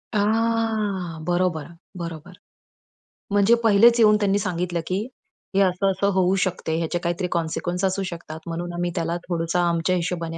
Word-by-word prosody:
आह! 215 -4 0
बरोबर, 175 -3 0 0.3
बरोबर. 170 0 -7 1.0
म्हणजे 205 +3 +5
पहिलेच 230 +2 +6
येऊन 215 -2 +6
त्यांनी 200 -1 +2
सांगितलं, 175 -2 -2
की 185 +1 0 0.6
हे 195 - +4
असं, 195 +1 +2
असं 195 +1 0
होऊ 185 0 +3
शकते, 170 -3 -2
याचे 170 +1 -1
काहीतरी 175 +2 -2
कॉन्सिक्वन्स 175 +2 -2
असू 190 +1 0
शकतात, 165 -2 -8
म्हणून 175 +1 -4
आम्ही 175 0 -2
त्याला 170 0 -1
थोडंसं 170 0 -1
आमच्या 170 +1 +1
हिशोबाने 170 -2 -3
180 Hz, 145 wpm, -23 LUFS, 170-200 Hz, 1.0 s, पहिलेच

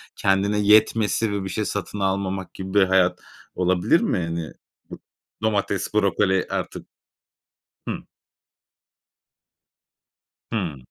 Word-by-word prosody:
kendine 100 +2 +1
yetmesi 105 +1 +3
ve 100 -1 -2
bir 95 - -4
şey 105 +3 -2
satın 105 +2 -4
almamak 95 -1 -2
gibi 95 0 -7
bir 100 - +6
hayat 95 -1 +3 0.4
olabilir 90 -1 +2
mi? - - 0
Hani 85 -2 -3 0.9
domates, 100 -2 0
brokoli 100 -2 +2
artık. - - -4 1.0
Hı. - - 0 2.6
Hıı. 90 -10 -2
95 Hz, 100 wpm, -23 LUFS, 95-105 Hz, 2.6 s, bir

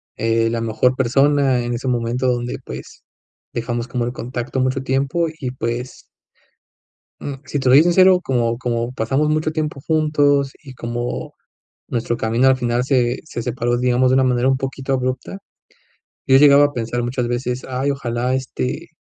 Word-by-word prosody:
eh, 115 0 +1
la 115 - -2
mejor 115 +3 +1
persona 135 +1 +2
en 120 0 -2
ese 130 +2 -5
momento 120 +1 0
donde, 120 0 -3
pues, - - -9 0.5
dejamos 120 +1 -3
como 120 -2 -2
el 120 - -2
contacto 125 +1 -4
mucho 130 +1 0
tiempo, 135 +6 0
y 130 -3 -3
pues 125 0 -4 1.2
mm, 140 - -5
si 140 +2 -2
te 130 -1 +1
soy 135 +4 +8
sincero, 185 +1 +5
como 120 -6 0
como 120 -1 -2
pasamos 135 +6 0
mucho 155 +1 0
tiempo 150 -3 -3
juntos, 145 -3 +2
y 135 -3 -11
como 120 0 -4 0.5
nuestro 120 0 -2
camino 115 +4 +2
al 130 0 +4
final 120 -1 0
se 125 -2 +1
se 120 - -5
separó, 120 0 -1
digamos, 125 +1 +2
de 130 - +3
una 130 - +4
manera 125 0 +2
un 135 0 +3
poquito 135 0 -3
abrupta, 130 +7 -2 0.9
yo 135 0 +6
llegaba 145 0 +7
a 145 - -2
pensar 120 +1 -2
muchas 120 0 -2
veces: 125 +1 -3
"Ay, 130 +2 -1
ojalá 125 -2 -2
este, 130 - -3
130 Hz, 165 wpm, -20 LUFS, 120-135 Hz, 1.2 s, soy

